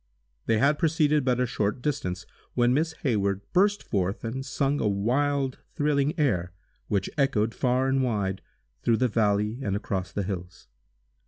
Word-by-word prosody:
They 115 - +3
had 140 +6 +3
proceeded 150 -2 +2
but 125 -1 +1
a 125 - +3
short 105 -1 -1
distance, 95 -10 -2 0.3
when 120 0 +3
Miss 160 +4 +1
Hayward 100 -7 +1
burst 205 +3 +3
forth, 95 -1 -1
and 125 +4 -3
sung 140 +1 0
a - - +2
wild, 130 +7 0 0.2
thrilling 145 0 +1
air, 95 - +1 0.3
which 100 -2 0
echoed 115 -5 +2
far 130 0 +1
and 135 0 +2
wide, 100 -6 -1 0.4
through 115 -1 +2
the 125 - +2
valley 105 0 +1
and 100 -6 -1
across 95 -2 -3
the 100 - -2
hills. 90 -2 -6
120 Hz, 160 wpm, -27 LUFS, 100-140 Hz, 0.4 s, They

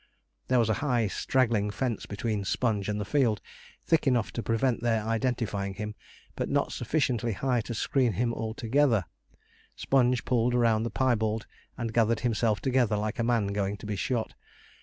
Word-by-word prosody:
There 130 - +3
was 115 -2 +3
a - - -2
high, 125 -6 +1
straggling 110 0 +1
fence 115 +2 -3
between 105 0 -2
Sponge 105 -1 0
and 105 0 -1
the 105 - -3
field, 120 -4 +2 0.5
thick 160 -3 +2
enough 120 -4 +2
to 120 - -3
prevent 115 +2 0
their 115 -2 +1
identifying 110 -4 -1
him, 105 +1 -5 0.4
but - - -2
not - - +1
sufficiently 120 -7 0
high 125 +2 0
to 115 +2 -6
screen 125 0 +1
him 115 +5 0
altogether. 115 0 +1 0.7
Sponge 125 -3 +2
pulled 125 -1 +2
round 115 -2 +2
the - - -3
piebald, 110 -4 0 0.3
and 115 -2 -3
gathered 115 -1 +2
himself 115 -3 +1
together 125 -5 +2
like 105 +3 -3
a - - +2
man 115 -4 +1
going 100 0 -1
to - - -11
be 105 0 -2
shot. 115 +3 -2
115 Hz, 170 wpm, -28 LUFS, 105-125 Hz, 0.7 s, There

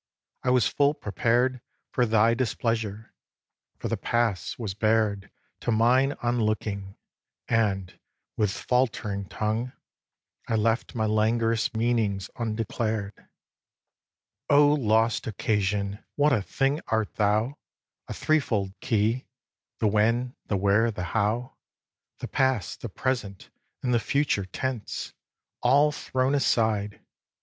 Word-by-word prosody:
I - - 0
was 125 -4 +4
full 145 +1 +2
prepared 120 +5 0 0.3
For 125 -1 +2
thy 110 +1 +4
displeasure, 115 -3 -2 0.6
for - - -4
the - - -1
past 115 -7 -1
was 110 -6 -4
bared 105 -1 +1 0.3
To - - -1
mine 125 +5 +3
on 120 0 +1
looking; 100 -2 -2 0.5
and, 100 -5 0 0.4
with 105 -2 +1
faltering 115 -3 -1
tongue, 110 +4 -2 0.7
I 115 - 0
left 115 +3 0
my 110 -2 +1
languorous 110 +1 +1
meanings 110 -4 0
undeclared. 110 -2 -2
xviii. - - -25 1.2
O 145 0 +6
lost 115 -4 +2
Occasion! 100 -1 -1
what 145 0 +3
a 110 - +2
thing 135 +9 0
art 110 -1 0
thou: 110 +6 +1 0.5
A - - -5
three 155 0 +2
fold 100 -8 -2
key, 115 +3 0 0.5
the - - -1
when, 115 +4 +2
the 100 - 0
where, 100 +4 +3
the 105 -5 -4
how, 110 +4 0 0.6
The - - -6
past, 130 -9 0
the 120 - -5
present 105 -3 -3 0.3
and 125 -1 +1
the 120 - +4
future 140 -6 0
tense, 125 +3 -4 0.5
All 140 +4 +4
thrown 130 -1 -1
aside. 110 -7 +1
115 Hz, 125 wpm, -26 LUFS, 105-125 Hz, 1.2 s, O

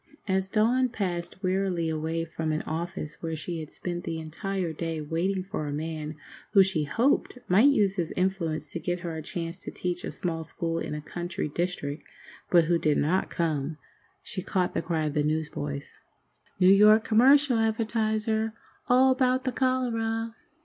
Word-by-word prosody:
As 190 -1 +1
Dawn 245 +5 +3
passed 185 -4 -4
wearily 185 -2 0
away 160 +1 -1
from 160 -1 -3
an 155 - -1
office 160 -1 -4
where 165 -1 -3
she 165 +2 -4
had 155 -1 -7
spent 175 -1 -5
the 165 - -3
entire 170 +2 -3
day 165 0 -3
waiting 170 +5 -1
for 185 -6 -4
a - - -3
man 155 0 -4 0.4
who 195 -2 +8
she 175 -6 0
hoped 240 - +1
might 205 +9 +6
use 205 -8 +2
his 170 -3 -1
influence 180 -4 -1
to 170 - -4
get 175 +1 -2
her 170 -2 -4
a 160 - -4
chance 165 +3 -4
to - - -7
teach 180 0 -3
a - - -3
small 165 -2 -3
school 165 +1 -3
in - - -4
a 150 - -4
country 175 +2 -4
district, 155 -2 -2 0.5
but 170 -2 +5
who 170 +1 +2
did 150 -2 +2
not 175 +6 +1
come, 155 -2 -1 0.5
she 185 - -4
caught 185 -1 0
the - - 0
cry 160 -3 -1
of 150 - -2
the 150 - +2
newsboys. 150 -2 -2 0.7
"New 185 +1 +7
York 210 +2 +7
Commercial 260 +3 +5
Advertiser! 220 0 0 0.3
All 260 +1 +5
'bout 255 0 +2
the 260 - 0
cholera!" 230 -3 0
175 Hz, 175 wpm, -27 LUFS, 160-215 Hz, 0.7 s, who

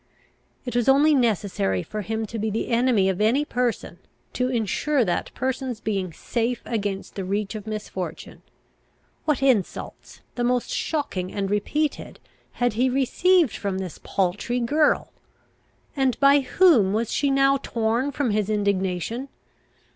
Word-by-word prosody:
It 245 -2 -5
was 240 +1 +2
only 290 +3 +5
necessary 200 - +1
for 215 - -5
him 220 +2 -3
to 225 +2 -6
be 220 +1 -1
the 215 +2 -2
enemy 235 -4 +3
of 190 +1 -1
any 250 +8 +3
person, 245 -3 -2 0.3
to 250 0 0
insure 250 +3 +1
that 175 - -2
person's 260 -2 -2
being 195 -5 -2
safe 235 +8 -2
against 205 -4 -3
the 195 - -4
reach 200 +2 -2
of 215 -1 -7
misfortune. 190 -6 -6 0.8
What 290 -3 +1
insults, 250 -8 -1
the 245 - -2
most 245 0 0
shocking 240 - -2
and 195 -1 -2
repeated, 295 +9 -2 0.3
had 245 -2 0
he 250 +4 +2
received 285 - +2
from 200 -2 -3
this 185 -4 -6
paltry 200 +6 -1
girl! 295 +6 +1 0.8
And 265 -3 +1
by 280 0 +6
whom 260 - +4
was 225 +1 -1
she 285 - +1
now 275 0 +4
torn 235 +1 -1
from 275 -4 -1
his 210 -1 0
indignation? 200 +4 -1
230 Hz, 145 wpm, -24 LUFS, 200-265 Hz, 0.8 s, by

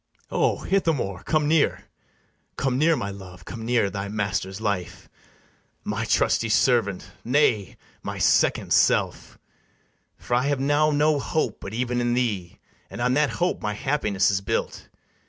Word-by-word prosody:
Enter - - -5
ITHAMORE. - - +3
O - - -8
Ithamore, 155 - 0
come 155 -2 +1
near; 155 -1 +2 0.7
Come 130 -2 -1
near, 165 +2 +4
my 100 -7 -3
love; 90 -2 -11
come 115 - -7
near, 115 -4 +1
thy 100 0 -4
master's 100 -2 -3
life, 100 -5 -3 0.8
My - - -2
trusty 115 - +1
servant, 110 -4 +1
nay, 120 - +1 0.2
my - - -5
second - - +2
self; - - +1 0.8
For - - -5
I 125 +3 +2
have 145 -2 0
now 145 +3 +2
no 150 0 +2
hope 140 -5 -2
but 100 +3 -7
even 125 0 -1
in 120 0 +1
thee, 105 -8 -2 0.3
And - - -9
on 125 +1 +1
that 150 +1 +2
hope 180 +1 -1
my 105 0 -2
happiness 105 -7 +1
is 95 0 0
built. 115 +3 -3
120 Hz, 155 wpm, -24 LUFS, 100-145 Hz, 0.8 s, near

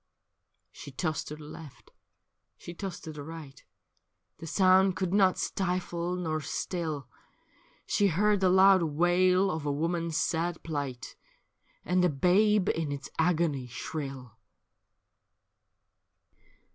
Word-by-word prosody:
She - - -10
tossed 155 +3 -3
to 150 - -6
the 155 - -12
left, 150 -1 -12 0.7
she 170 - -9
tossed 190 +1 -6
to 160 - -6
the 150 - -8
right. 145 -3 -10 0.8
The 165 - -8
sound 190 +1 +4
could 185 +1 -2
not 195 -2 +4
stifle 180 -1 -2
nor 160 -3 -2
still; 155 -4 -4 0.8
She 205 - +2
heard 205 +4 +2
the 190 -1 +3
loud 190 0 +6
wail 180 +4 +2
of 160 -3 -4
a 145 - -1
woman's 165 +2 -1
sad 170 0 0
pHght, 145 -6 -5 0.7
And 180 0 +2
a 180 - +4
babe 185 +7 +3
in 160 -3 -1
its 140 -1 -6
agony 160 -6 +1
shrill. 130 -3 -7
170 Hz, 120 wpm, -29 LUFS, 150-185 Hz, 0.8 s, loud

